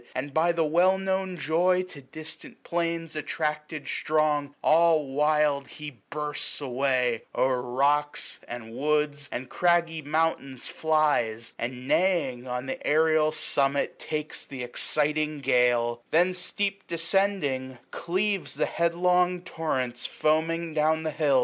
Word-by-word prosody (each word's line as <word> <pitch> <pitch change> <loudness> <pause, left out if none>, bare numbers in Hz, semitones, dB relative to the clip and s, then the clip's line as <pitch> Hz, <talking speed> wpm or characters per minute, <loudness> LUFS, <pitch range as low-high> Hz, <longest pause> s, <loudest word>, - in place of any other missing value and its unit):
And 140 +2 -4
by 165 +3 +3
the 165 -1 +1
well 175 +5 +4
known 190 -1 -2
joy 180 +4 +2
to 165 -6 -11
distant 155 +4 -10
plains 165 -1 -2
Attracted 150 0 -3
strong, 150 -2 0
all 160 -1 +4
wild 145 0 +1
he 150 -6 -9
bursts 150 0 -2
away; 130 -3 0
810 - - -4
O'er 130 -1 +1
rocks, 140 +4 +1
and 115 -2 -7
woods, 150 +1 0
and 125 +1 -4
craggy 170 0 +1
mountains 150 -4 -1
flies; 145 -8 0
And, 125 +2 -5
neighing, 140 -9 +1
on 125 +1 -3
the 135 - -5
aerial 155 0 +3
summit 140 -2 0
takes 155 -1 -4
Th' - - -15
exciting 150 +4 0
gale 120 -3 +2
j - - -29
then, 175 +3 +3
steep 195 +2 -2
descending, 165 -7 0
cleaves 195 +3 -1
The - - +1
headlong 180 +1 +1
torrents 130 -9 -2
foaming 160 +1 0
down 160 +1 +2
the 155 - -2
hills. 145 -3 +3
150 Hz, 130 wpm, -27 LUFS, 135-170 Hz, -, well